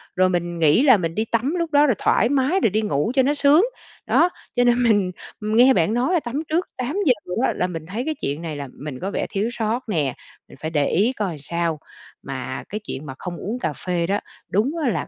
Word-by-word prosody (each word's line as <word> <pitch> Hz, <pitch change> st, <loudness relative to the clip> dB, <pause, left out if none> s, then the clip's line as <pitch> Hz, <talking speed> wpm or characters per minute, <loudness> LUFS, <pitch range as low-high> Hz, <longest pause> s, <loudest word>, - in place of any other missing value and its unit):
rồi 185 Hz, 0 st, +4 dB
mình 175 Hz, -1 st, -2 dB
nghĩ 160 Hz, -, +4 dB
là 255 Hz, -7 st, +7 dB
mình 165 Hz, -2 st, -3 dB
đi 220 Hz, -, 0 dB
tắm 240 Hz, +9 st, 0 dB
lúc 335 Hz, -2 st, -2 dB
đó, 290 Hz, +1 st, +5 dB
rồi 250 Hz, -7 st, +2 dB
thoải 235 Hz, -, +2 dB
mái, 285 Hz, +7 st, +2 dB
rồi 225 Hz, -, +3 dB
đi 215 Hz, +3 st, 0 dB
ngủ 205 Hz, -, 0 dB
cho 265 Hz, -, +5 dB
nó 285 Hz, +3 st, +2 dB
sướng. 295 Hz, +6 st, +5 dB, 0.4 s
Đó, 345 Hz, -, +4 dB, 0.3 s
cho 245 Hz, -, +3 dB
nên 245 Hz, 0 st, +3 dB
mình 205 Hz, -5 st, +3 dB, 0.3 s
nghe 230 Hz, +5 st, +5 dB
bạn 180 Hz, +3 st, +2 dB
nói 250 Hz, +8 st, +1 dB
là 350 Hz, -, +4 dB
tắm 275 Hz, +4 st, -4 dB
trước 340 Hz, +4 st, 0 dB
8:00 285 Hz, +4 st, +1 dB, 0.3 s
á -, -, +1 dB
là 180 Hz, -, 0 dB
mình 165 Hz, -3 st, -6 dB
thấy 220 Hz, +8 st, -4 dB
cái 315 Hz, -, -1 dB
chuyện 145 Hz, +3 st, -2 dB
này 160 Hz, -3 st, -5 dB
là 140 Hz, -1 st, -5 dB
mình 140 Hz, -3 st, -6 dB
có 195 Hz, +2 st, -3 dB
vẻ -, -, -1 dB
thiếu 205 Hz, +4 st, -1 dB
sót 230 Hz, +1 st, -2 dB
nè, 150 Hz, -10 st, 0 dB, 0.3 s
mình -, -, -15 dB
phải 160 Hz, +1 st, -3 dB
để 145 Hz, -3 st, +1 dB
ý 215 Hz, +9 st, +2 dB
coi 190 Hz, -, -3 dB
sao. 165 Hz, +1 st, -2 dB, 0.4 s
Mà 130 Hz, -1 st, -5 dB
cái 210 Hz, -, -4 dB
chuyện 150 Hz, -5 st, -6 dB
mà 130 Hz, -, -6 dB
không 175 Hz, -2 st, -5 dB
uống 220 Hz, +10 st, -4 dB
cà 150 Hz, -, -2 dB
phê 175 Hz, 0 st, -2 dB
đó, 200 Hz, +1 st, +1 dB, 0.3 s
đúng 215 Hz, +9 st, +1 dB
á 255 Hz, -, +2 dB
là -, -, -2 dB
215 Hz, 245 wpm, -22 LUFS, 170-255 Hz, 0.4 s, là